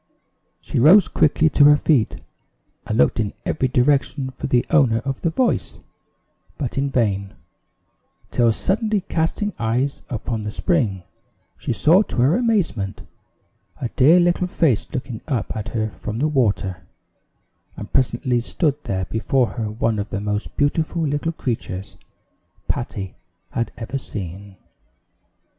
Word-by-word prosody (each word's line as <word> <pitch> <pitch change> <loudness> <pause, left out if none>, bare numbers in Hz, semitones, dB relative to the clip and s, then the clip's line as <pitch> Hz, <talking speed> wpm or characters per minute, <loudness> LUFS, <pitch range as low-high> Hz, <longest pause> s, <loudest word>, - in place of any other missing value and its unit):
She - - -2
rose 165 - +7
quickly 155 +1 +3
to 145 - +5
her 145 0 +7
feet, 140 -8 +1 0.7
and 110 - -1
looked 120 - +3
in 105 -3 -1
every 130 - 0
direction 135 +1 +1
for 135 - -5
the 125 -2 +2
owner 135 -9 +4
of 135 -1 -3
the 165 - +1
voice, 245 +10 0 0.8
but 135 -5 -4
in 140 +1 0
vain; 100 -6 0 1.0
till 120 -2 +3
suddenly 210 - 0
casting 180 +5 -1
eyes 125 +5 -1
upon 115 -1 -3
the 105 - -4
spring, 105 - 0 0.5
she - - -4
saw, 160 - +5
to - - -5
her 130 +7 +3
amazement, 200 - 0 0.8
a 120 - -3
dear 150 +9 +5
little 175 +1 +2
face 155 - +1
looking 125 -3 -5
up 120 - -2
at 110 0 -4
her 110 -1 -2
from 110 +2 -6
the 145 +6 +1
water; 105 - 0 1.0
and 105 - -8
presently 125 -2 +1
there 120 - -7
stood 140 - -1
before 120 +2 +1
her 110 -3 -4
one 110 0 -1
of 100 - -4
the 100 - -3
most 105 +1 -3
beautiful 160 +3 0
little 145 +3 -1
creatures 110 - -4 0.7
Patty 95 -2 -3 0.4
had 115 -1 -2
ever 125 +4 -4
seen. 100 -3 -7
125 Hz, 140 wpm, -21 LUFS, 110-150 Hz, 1.0 s, rose